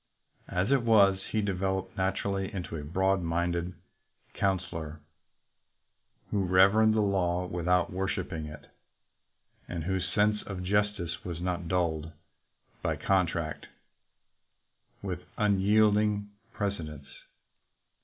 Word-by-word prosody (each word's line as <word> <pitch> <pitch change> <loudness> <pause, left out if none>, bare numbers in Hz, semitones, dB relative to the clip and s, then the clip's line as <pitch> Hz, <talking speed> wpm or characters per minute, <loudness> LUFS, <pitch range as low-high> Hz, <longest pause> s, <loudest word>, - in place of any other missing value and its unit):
As 95 +7 0
it 140 -2 +4
was, 100 -4 +5
hd 110 -2 +1
developed 95 -1 -1
naturally 95 +1 -1
into 90 -4 -5
a 75 - -5
broad 95 +5 +1
minded 85 +1 -1 0.6
coun 95 -1 +2
selor 80 -4 -7 1.3
who 100 -2 +1
reverenced 100 +4 +5
the 110 - +3
law 90 -3 +1
without 90 0 +1
worshiping 95 -4 -2
it, 75 -1 -10 1.0
and 85 -3 -4
whose 95 +1 -2
sense 105 0 +2
of 95 -3 -5
justice 100 -3 0
was 85 -2 -5
not 90 -1 -2
dulled 80 -3 -1 0.7
by - - 0
contact 85 -5 0 1.4
with 90 -3 -3 0.2
unyielding 105 0 +3 0.2
precedents. 80 -10 -4
95 Hz, 105 wpm, -29 LUFS, 85-100 Hz, 1.4 s, was